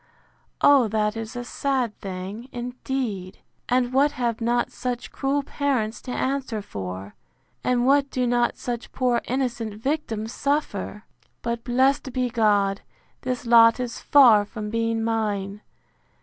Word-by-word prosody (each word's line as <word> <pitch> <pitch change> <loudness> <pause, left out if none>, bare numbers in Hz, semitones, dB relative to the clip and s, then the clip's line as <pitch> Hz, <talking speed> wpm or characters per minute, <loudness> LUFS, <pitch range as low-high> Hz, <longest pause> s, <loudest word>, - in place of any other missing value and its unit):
O 275 -5 +6
that 210 0 0
is 225 0 -6
a 245 - -4
sad 255 -3 -1
thing, 195 +6 -6
indeed!—And 245 0 -3
what 285 +2 +3
have 235 -3 -2
not 240 +1 +1
such 245 -1 -4
cruel 280 +1 0
parents 260 -7 -1
to 255 - -7
answer 260 -5 -2
for! 95 - -6 0.5
And 245 -1 +2
what 280 +1 +4
do 255 -2 0
not 240 0 +1
such 240 -1 -5
poor 250 -2 +1
innocent 240 -4 -2
victims 225 -3 -2
suffer!—But, 235 -3 -3
blessed 260 +2 +2
be 250 -1 0
God, 205 -4 +2 0.4
this 250 -1 -3
lot 230 0 +6
is 245 -2 -4
far 240 -8 +7
from 210 0 -6
being 230 0 0
mine! 210 -3 -1
240 Hz, 130 wpm, -24 LUFS, 215-255 Hz, 0.5 s, far